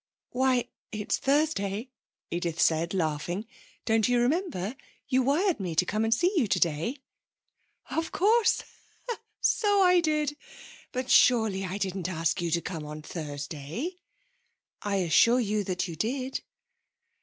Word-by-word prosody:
'Why, 255 Hz, -1 st, +2 dB, 0.2 s
it's 210 Hz, -1 st, -2 dB
Thursday,' 265 Hz, -6 st, 0 dB, 0.4 s
Edith 170 Hz, -1 st, -2 dB
said, 165 Hz, +1 st, +2 dB
laughing. 175 Hz, +3 st, -2 dB, 0.4 s
'Don't 225 Hz, -1 st, +3 dB
you 245 Hz, 0 st, +3 dB
remember? 255 Hz, -, 0 dB, 0.3 s
You 260 Hz, -1 st, +3 dB
wired 315 Hz, +8 st, +2 dB
to -, -, -8 dB
me 175 Hz, -4 st, -3 dB
to 180 Hz, -, +3 dB
come 215 Hz, +4 st, 0 dB
and 225 Hz, -, 0 dB
see 350 Hz, -, +3 dB
you 280 Hz, -10 st, +3 dB
today.' 170 Hz, -, 0 dB, 0.9 s
'Of 325 Hz, 0 st, -1 dB
course; 440 Hz, +5 st, +3 dB, 0.8 s
so 410 Hz, -2 st, +3 dB
I 360 Hz, -1 st, +6 dB
did. 305 Hz, -3 st, 0 dB, 0.6 s
But, 255 Hz, 0 st, -3 dB
surely, 220 Hz, -6 st, +4 dB
I 185 Hz, +2 st, -3 dB
didn't 190 Hz, -3 st, -2 dB
ask 165 Hz, -1 st, 0 dB
you 170 Hz, -, -1 dB
to 170 Hz, +1 st, +1 dB
come 165 Hz, -4 st, -5 dB
on 150 Hz, 0 st, -8 dB
Thursday?' 150 Hz, -, -5 dB, 0.8 s
'I 205 Hz, -1 st, -1 dB
assure 195 Hz, +7 st, +4 dB
you 210 Hz, -3 st, 0 dB
that 185 Hz, 0 st, -1 dB
you 170 Hz, -, -6 dB
did.' 255 Hz, -, -2 dB
215 Hz, 140 wpm, -28 LUFS, 175-270 Hz, 0.9 s, I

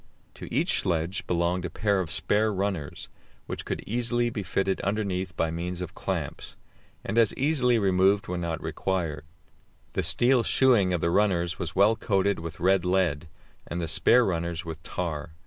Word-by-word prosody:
To -, -, -10 dB
each 155 Hz, +9 st, +1 dB
sledge 85 Hz, 0 st, -2 dB
belonged 85 Hz, +1 st, 0 dB
a 90 Hz, -, -3 dB
pair 100 Hz, +3 st, 0 dB
of 90 Hz, -4 st, -2 dB
spare 110 Hz, +1 st, +1 dB
runners, 95 Hz, -6 st, -3 dB, 0.4 s
which -, -, -5 dB
could -, -, -4 dB
easily 120 Hz, +1 st, 0 dB
be 105 Hz, -, -3 dB
fitted 95 Hz, +1 st, -1 dB
underneath 95 Hz, -3 st, -2 dB
by 80 Hz, -, 0 dB
means 85 Hz, +2 st, -4 dB
of 90 Hz, 0 st, -5 dB
clamps, 85 Hz, -9 st, -4 dB, 0.5 s
and 110 Hz, +4 st, 0 dB
as 115 Hz, -3 st, +3 dB
easily 130 Hz, -4 st, +2 dB
removed 95 Hz, 0 st, +2 dB
when 90 Hz, 0 st, -3 dB
not 85 Hz, -2 st, -3 dB
required. 80 Hz, -6 st, -2 dB, 0.7 s
The -, -, 0 dB
steel 125 Hz, 0 st, +3 dB
shoeing 115 Hz, -7 st, +3 dB
of 90 Hz, -2 st, 0 dB
the 85 Hz, -, +1 dB
runners 90 Hz, -3 st, +1 dB
was 85 Hz, -, -4 dB
well 100 Hz, +4 st, +5 dB
coated 100 Hz, -2 st, 0 dB
with 80 Hz, -1 st, -7 dB
red 95 Hz, +1 st, +3 dB
lead, 90 Hz, -5 st, +1 dB, 0.4 s
and 85 Hz, -, -4 dB
the 85 Hz, -, -2 dB
spare 120 Hz, +9 st, +4 dB
runners 85 Hz, -1 st, -2 dB
with 80 Hz, -2 st, -7 dB
tar. 80 Hz, -2 st, -4 dB
95 Hz, 170 wpm, -27 LUFS, 85-105 Hz, 0.7 s, well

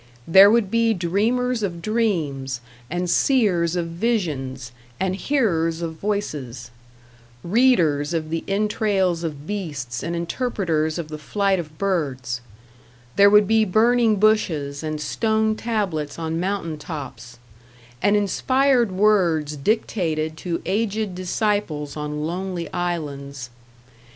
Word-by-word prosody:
There 195 Hz, +4 st, +8 dB
would 215 Hz, -3 st, +2 dB
be 230 Hz, -1 st, +2 dB
dreamers 225 Hz, +8 st, 0 dB
of 175 Hz, -4 st, -3 dB
dreams 160 Hz, -, -1 dB, 0.3 s
and 175 Hz, +2 st, -2 dB
seers 180 Hz, -7 st, +2 dB
of 175 Hz, -1 st, -1 dB
visions 155 Hz, -, -2 dB, 0.3 s
and 190 Hz, 0 st, 0 dB
hearers 170 Hz, -, 0 dB
of 165 Hz, -1 st, -3 dB
voices; 145 Hz, -, -4 dB, 0.7 s
readers 170 Hz, -, +3 dB
of 160 Hz, -2 st, -2 dB
the 165 Hz, -, -2 dB
entrails 195 Hz, -4 st, 0 dB
of 150 Hz, -3 st, -5 dB
beasts 145 Hz, -, -4 dB
and 170 Hz, +1 st, -3 dB
interpreters 170 Hz, -4 st, -1 dB
of 165 Hz, -3 st, -5 dB
the 155 Hz, 0 st, -6 dB
flight 195 Hz, +5 st, 0 dB
of 155 Hz, -2 st, -8 dB
birds; 135 Hz, -11 st, -2 dB, 0.7 s
there 200 Hz, 0 st, +7 dB
would 210 Hz, -1 st, +5 dB
be 220 Hz, +1 st, +4 dB
burning 225 Hz, +2 st, +3 dB
bushes 170 Hz, -10 st, +1 dB
and 155 Hz, -1 st, -3 dB
stone 220 Hz, +6 st, 0 dB
tablets 200 Hz, -11 st, -2 dB
on 165 Hz, 0 st, -2 dB
mountain 180 Hz, -4 st, -2 dB
tops, 125 Hz, -7 st, -8 dB, 0.6 s
and 205 Hz, +1 st, +3 dB
inspired 250 Hz, +3 st, +2 dB
words 180 Hz, -7 st, +2 dB
dictated 160 Hz, -3 st, -1 dB
to 170 Hz, +1 st, -4 dB
aged 215 Hz, -1 st, -1 dB
disciples 180 Hz, -5 st, -2 dB
on 150 Hz, 0 st, -4 dB
lonely 180 Hz, +1 st, -3 dB
islands. 140 Hz, -7 st, -4 dB
175 Hz, 120 wpm, -22 LUFS, 155-210 Hz, 0.7 s, There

